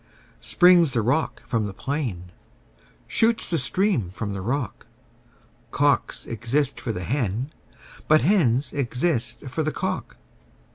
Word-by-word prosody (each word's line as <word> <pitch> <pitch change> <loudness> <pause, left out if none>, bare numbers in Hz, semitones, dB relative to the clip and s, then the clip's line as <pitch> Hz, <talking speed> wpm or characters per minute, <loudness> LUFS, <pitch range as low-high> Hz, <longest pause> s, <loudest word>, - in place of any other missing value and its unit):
Springs 175 -5 +5
the 120 - +2
rock 135 +8 0
from 115 -5 -1
the 95 - -8
plain, 115 - -4 0.7
shoots 225 -3 +1
the 165 - +2
stream 180 - +1
from 100 +2 -5
the 95 - -4
rock: 120 +2 -3 0.8
Cocks - - +1
exist 130 +5 -1
for 115 - -2
the 90 -4 -4
hen: 120 - -2 0.6
but 155 0 +5
hens 140 - +2
exist 125 0 -1
for 135 +3 -4
the 155 0 0
cock. - - -4
130 Hz, 130 wpm, -24 LUFS, 115-155 Hz, 0.8 s, Springs